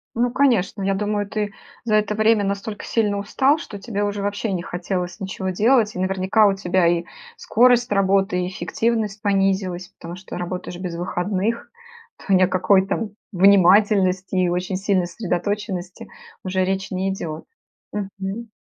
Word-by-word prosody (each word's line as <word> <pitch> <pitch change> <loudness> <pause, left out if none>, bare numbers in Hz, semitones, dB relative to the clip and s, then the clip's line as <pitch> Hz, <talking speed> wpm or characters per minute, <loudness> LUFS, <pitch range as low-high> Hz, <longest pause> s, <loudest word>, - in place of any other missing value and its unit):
Ну, 240 +1 +2
конечно, 235 -7 +1
я 195 0 +1
думаю, 205 +1 -1
ты 210 0 -3 0.3
за 215 -2 +2
это 210 0 +1
время 215 0 +3
настолько 200 +2 -4
сильно 210 -3 0
устал, 265 +8 +2
что 215 -10 -8
тебе 205 0 -3
уже 205 0 -2
вообще 205 +2 -2
не 180 -2 -1
хотелось 180 +1 -4
ничего 190 0 -4
делать. 220 +3 +3
И - - -4
наверняка 190 +3 +3
у 200 - +3
тебя 185 -2 +1
и 170 0 +2 0.3
скорость 245 +1 +3
работы, 195 -2 +2
и - - -2
эффективность 220 +1 -2
понизилась, 195 -3 0
потому 170 +1 -10
что 185 - -8
работаешь 180 0 -5
без 180 -2 -5
выходных, 190 +5 -2 0.5
то 195 - -2
ни 185 - +5
о - - +4
какой 190 +1 +3
там 210 +2 -2 0.2
внимательности 190 0 +4
и 185 -1 +2
очень 180 +2 -2
сильной 190 -2 +1
сосредоточенности 185 0 -4 0.3
уже 185 0 0
речь 195 +1 -2
не 190 +1 -1
идет. 160 -5 -6 0.5
Мгм. 200 +2 -5
195 Hz, 160 wpm, -22 LUFS, 185-210 Hz, 0.5 s, ни